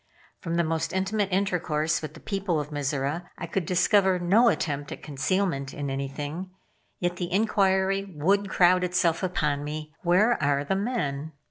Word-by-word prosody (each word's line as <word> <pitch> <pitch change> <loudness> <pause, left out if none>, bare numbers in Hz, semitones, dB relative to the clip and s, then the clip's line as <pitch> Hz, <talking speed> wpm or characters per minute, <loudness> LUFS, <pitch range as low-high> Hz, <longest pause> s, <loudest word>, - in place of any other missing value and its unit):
From 170 -1 -3
the 170 - +3
most 160 +1 -1
intimate 195 +1 0
intercourse 170 -5 0
with 155 -1 -7
the - - -11
people 195 -5 -1
of 150 +1 -5
Mizora, 145 +3 -2
I - - -5
could 170 0 -2
discover 190 +1 +3
no 195 +7 +4
attempt 145 -7 -2
at - - -8
concealment 150 -1 -1
in 140 -2 -3
anything, 145 +6 -4 0.5
yet 175 0 -1
the 175 0 -4
inquiry 195 -1 +2
would 195 +6 +2
crowd 180 0 +4
itself 180 -2 +1
upon 150 -6 0
me. 155 +1 -6
"Where 190 +6 +3
are 140 -1 +2
the 190 - -1
men?" 160 - -2
175 Hz, 160 wpm, -26 LUFS, 150-190 Hz, 0.5 s, no